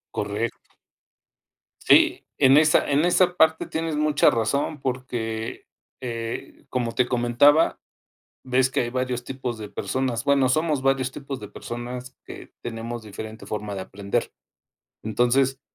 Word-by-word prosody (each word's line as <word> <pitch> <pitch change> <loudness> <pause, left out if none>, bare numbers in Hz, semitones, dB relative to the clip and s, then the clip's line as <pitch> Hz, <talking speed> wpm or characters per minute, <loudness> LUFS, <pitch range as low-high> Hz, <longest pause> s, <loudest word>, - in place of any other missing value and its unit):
Correcto. - - -2 1.2
Sí, - - +4
en 135 +2 +6
esa 150 -1 +4
en 145 +3 +3
esa 180 0 +3
parte 160 0 +4
tienes 160 -1 -2
mucha 150 -1 +4
razón 140 +6 -1
porque, 120 -4 -4 0.4
eh, 115 -2 -5
como 120 -2 -1
te 125 -1 +2
comentaba, 125 +6 +4 0.7
ves 130 +1 +2
que - - 0
hay 120 - -1
varios 125 -1 -2
tipos 125 -3 -5
de 105 -1 -7
personas. 130 0 -2
Bueno, 140 -2 +3
somos 155 +1 +1
varios 135 -1 +1
tipos 140 -1 -6
de 105 - -8
personas 125 +3 -7
que - - -10
tenemos 115 0 -5
diferente 110 +1 -8
forma 105 -1 -4
de 95 - -4
aprender. 100 +1 -3 0.7
Entonces 130 +4 +1
125 Hz, 135 wpm, -24 LUFS, 115-140 Hz, 1.2 s, en